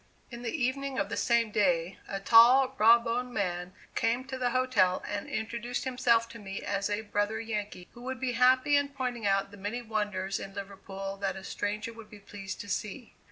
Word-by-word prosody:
In 235 Hz, -1 st, -8 dB
the 240 Hz, -, -3 dB
evening 275 Hz, -1 st, -1 dB
of 200 Hz, 0 st, 0 dB
the 225 Hz, -, -3 dB
same 235 Hz, -2 st, +2 dB
day, 180 Hz, -4 st, +1 dB
a 195 Hz, -, -3 dB
tall, 245 Hz, +5 st, +7 dB
raw 225 Hz, +2 st, +8 dB
boned 245 Hz, +1 st, -3 dB
man 180 Hz, -2 st, -2 dB, 0.2 s
came 235 Hz, +3 st, +1 dB
to 265 Hz, -, -4 dB
the 250 Hz, -1 st, +1 dB
hotel 240 Hz, -8 st, +2 dB
and 205 Hz, -1 st, -4 dB
introduced 235 Hz, +2 st, -3 dB
himself 245 Hz, -3 st, +2 dB
to 230 Hz, -, -10 dB
me 195 Hz, -2 st, -6 dB
as 200 Hz, 0 st, -1 dB
a 205 Hz, +1 st, -1 dB
brother 205 Hz, +1 st, -1 dB
Yankee, 210 Hz, -5 st, -5 dB
who 240 Hz, -, -14 dB
would 260 Hz, 0 st, -5 dB
be 260 Hz, -1 st, -1 dB
happy 255 Hz, +4 st, +4 dB
in 285 Hz, 0 st, +3 dB
pointing 250 Hz, -5 st, -3 dB
out 195 Hz, 0 st, +1 dB
the 205 Hz, -, -12 dB
many 210 Hz, +5 st, -4 dB
wonders 205 Hz, -3 st, -2 dB
in 195 Hz, 0 st, -8 dB
Liverpool 195 Hz, 0 st, -6 dB
that 195 Hz, -1 st, -2 dB
a 190 Hz, -, -8 dB
stranger 210 Hz, +3 st, -3 dB
would 225 Hz, -1 st, -12 dB
be 210 Hz, -, -12 dB
pleased 195 Hz, -1 st, -8 dB
to 205 Hz, -, -9 dB
see. 215 Hz, +5 st, -4 dB
220 Hz, 205 wpm, -30 LUFS, 200-245 Hz, 0.2 s, raw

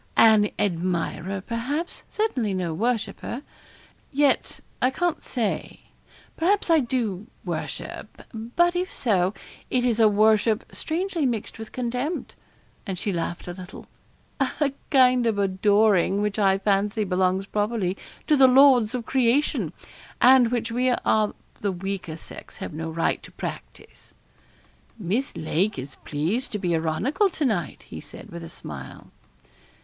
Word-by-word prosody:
'An 215 Hz, -2 st, +6 dB
admirer, 185 Hz, 0 st, -1 dB
perhaps 255 Hz, -, -3 dB
certainly 255 Hz, -, -1 dB
no 175 Hz, -3 st, -2 dB
worshipper. 235 Hz, -, -2 dB, 0.7 s
Yet, 285 Hz, 0 st, +1 dB, 0.2 s
I 255 Hz, -, +4 dB
can't 345 Hz, +5 st, -1 dB
say. 230 Hz, -6 st, -3 dB, 0.5 s
Perhaps 365 Hz, +2 st, +2 dB
I 325 Hz, -, +6 dB
do 230 Hz, -6 st, -2 dB, 0.2 s
worship; -, -, -6 dB
but 245 Hz, +11 st, +1 dB
if 365 Hz, +1 st, -1 dB
so, 195 Hz, -5 st, +1 dB, 0.3 s
it 250 Hz, -1 st, +1 dB
is 235 Hz, -2 st, +1 dB
a 220 Hz, -, +7 dB
worship 215 Hz, +2 st, +3 dB
strangely 335 Hz, -2 st, -1 dB
mixed 225 Hz, -2 st, -3 dB
with 220 Hz, -, -8 dB
contempt.' 250 Hz, +6 st, -3 dB, 0.5 s
And 190 Hz, -2 st, -3 dB
she 195 Hz, +2 st, -2 dB
laughed 175 Hz, +1 st, -3 dB
a 175 Hz, -, -4 dB
little. 185 Hz, +1 st, -10 dB, 0.5 s
'A 275 Hz, +1 st, 0 dB, 0.2 s
kind 255 Hz, -3 st, +5 dB
of 220 Hz, -3 st, +1 dB
adoring 200 Hz, 0 st, +3 dB
which 210 Hz, 0 st, -1 dB
I 195 Hz, -2 st, +4 dB
fancy 205 Hz, +2 st, +1 dB
belongs 185 Hz, 0 st, +1 dB
properly 205 Hz, -2 st, -1 dB, 0.3 s
to 305 Hz, -, +4 dB
the 270 Hz, -2 st, +7 dB
lords 255 Hz, -3 st, +6 dB
of 240 Hz, -2 st, -4 dB
creation, 260 Hz, +3 st, +1 dB, 0.5 s
and 255 Hz, -1 st, +7 dB
which 230 Hz, -1 st, -2 dB
we 250 Hz, +2 st, +1 dB
of 215 Hz, -3 st, +1 dB, 0.2 s
the 205 Hz, -2 st, 0 dB
weaker 185 Hz, -3 st, -4 dB
sex -, -, -12 dB
have -, -, -6 dB
no 160 Hz, +1 st, -4 dB
right 165 Hz, +1 st, 0 dB
to -, -, -13 dB
practise.' -, -, -9 dB, 0.8 s
'Miss 220 Hz, +7 st, -2 dB
Lake 180 Hz, +5 st, 0 dB
is 135 Hz, +1 st, -7 dB
pleased 165 Hz, -, -2 dB
to -, -, 0 dB
be 180 Hz, -4 st, -1 dB
ironical 165 Hz, -, +1 dB
to 320 Hz, -4 st, -2 dB
night,' 200 Hz, -, -1 dB
he -, -, -9 dB
said, -, -, -11 dB
with 85 Hz, -, -7 dB
a 80 Hz, -, -8 dB
smile. -, -, -9 dB
220 Hz, 140 wpm, -25 LUFS, 190-255 Hz, 0.8 s, a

